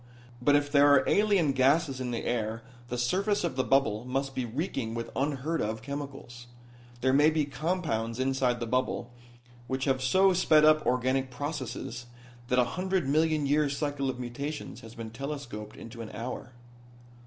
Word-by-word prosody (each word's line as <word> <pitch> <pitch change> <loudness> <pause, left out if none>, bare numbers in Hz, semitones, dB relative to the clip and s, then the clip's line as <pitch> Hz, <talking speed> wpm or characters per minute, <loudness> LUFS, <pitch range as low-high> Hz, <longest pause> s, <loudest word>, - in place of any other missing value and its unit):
But 145 +3 +4
if 145 0 +1
there 145 0 +6
are 140 - +5
alien 200 -8 +3
gases 135 +1 +2
in 125 - -2
the 120 -1 -3
air 115 -1 -2 0.2
the 125 - -4
surface 195 - +1
of 170 -6 -1
the 130 - +1
bubble 115 -6 +2
must 135 +2 -2
be 130 - -2
reeking 120 -2 -3
with 115 0 -4
unheard 145 +3 -1
of 110 +1 -3
chemicals. 135 -3 -7 0.5
There 130 +1 +3
may 145 +3 +6
be 155 -2 +1
compounds 140 -6 -2
inside 130 -2 +1
the 120 - -2
bubble 125 0 -1 0.6
which 130 0 -2
have 130 -2 +1
so 190 +9 +4
sped 155 -4 +5
up 155 0 +5
organic 130 +1 +1
processes 130 -3 -5 0.4
that 125 0 +1
a 125 - +6
hundred 185 +2 -1
million 155 +1 +2
year 145 +1 +2
cycle 140 -1 -2
of 125 -1 -4
mutations 140 +5 -5
has 115 0 -12
been 115 -1 -7
telescoped 120 -5 -6
into 115 +1 -9
an 110 - -7
hour." 125 +2 -6
135 Hz, 170 wpm, -29 LUFS, 120-150 Hz, 0.6 s, there